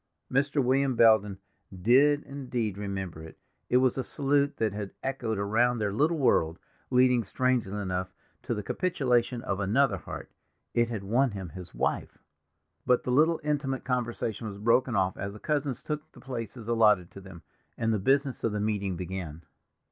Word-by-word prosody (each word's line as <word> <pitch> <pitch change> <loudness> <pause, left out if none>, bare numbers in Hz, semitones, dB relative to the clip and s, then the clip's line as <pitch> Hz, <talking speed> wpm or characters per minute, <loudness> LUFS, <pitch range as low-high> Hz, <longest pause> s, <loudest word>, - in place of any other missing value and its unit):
Mr. 140 +1 +2
William 130 +1 +2
Belden 110 -4 +5 0.4
did 140 +8 +4
indeed 125 -7 -3
remember 95 -5 -5
it; 80 0 -11 0.3
it 125 - +4
was 130 0 +2
a - - 0
salute 140 +1 0
that 110 -3 0
had 100 -1 -4
echoed 120 -5 -2
around 115 +5 +2
their 105 -3 -1
little 155 +8 +2
world, 85 - +2 0.3
leading, 125 -1 +4
strangely 115 -2 0
enough, 95 -1 -3 0.3
to 120 - -2
the 105 - -4
capitulation 125 - 0
of 100 - -2
another 115 +8 +2
heart—it 120 0 -5
had 110 -4 -4
won 125 +7 +2
him 95 -5 -6
his 90 +1 -10
wife. - - -2 0.7
But 125 -1 +2
the 125 - -2
little 160 +5 +4
intimate 140 -3 -1
conversation 120 -3 -2
was 100 -2 -7
broken 120 +3 +2
off 95 -1 +1
as 100 +1 -4
the 105 - -10
cousins 145 -2 -2
took 150 0 -5
the - - -14
places 115 -3 -6
allotted 105 -6 +3
to 100 - -11
them, 95 -4 -12 0.3
and 115 0 +1
the 105 - 0
business 135 +5 +1
of 115 - 0
the 105 - -1
meeting 100 -3 -1
began. 85 -3 -6
115 Hz, 170 wpm, -28 LUFS, 100-135 Hz, 0.7 s, Belden